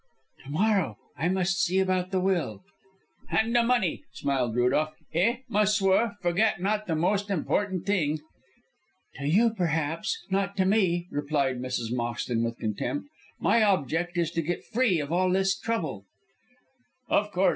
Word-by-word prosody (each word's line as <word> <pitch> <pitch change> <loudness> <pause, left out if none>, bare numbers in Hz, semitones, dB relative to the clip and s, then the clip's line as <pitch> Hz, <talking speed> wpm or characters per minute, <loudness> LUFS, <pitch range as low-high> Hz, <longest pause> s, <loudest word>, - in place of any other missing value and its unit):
"To - - -10
morrow. 185 - +1 0.2
I 165 +5 0
must 185 0 +1
see 185 +2 +1
about 185 -1 +1
the 190 -1 0
will." 175 - -1 0.7
"And 225 +2 +1
the 240 - +6
money," 230 -7 +1
smiled 125 -5 -1
Rudolph. 140 +6 +1 0.2
"Eh, 230 +10 +2
ma 210 -3 +1
s[oe]ur, 205 +1 +2
forget 180 +4 +2
not 210 +3 -1
the 165 - 0
most 200 +6 0
important 190 0 -1
thing." 160 -7 +1 1.0
"To 140 +1 -3
you, 220 +8 +4
perhaps, 165 - -1
not 195 +1 0
to 190 - +3
me," 185 -4 +2
replied 145 -3 0
Mrs. 125 -2 -3
Moxton, 120 -1 -1
with 115 0 -2
contempt. 120 - -3 0.3
"My 230 - +3
object 175 - +1
is 165 -2 +1
to 165 - -1
get 175 +3 -3
free 235 -7 +2
of 145 0 -4
all 185 +2 +2
this 190 +1 +2
trouble." 170 - -3 1.0
"Of 205 -1 +1
course. 190 0 +3
180 Hz, 155 wpm, -27 LUFS, 150-205 Hz, 1.0 s, the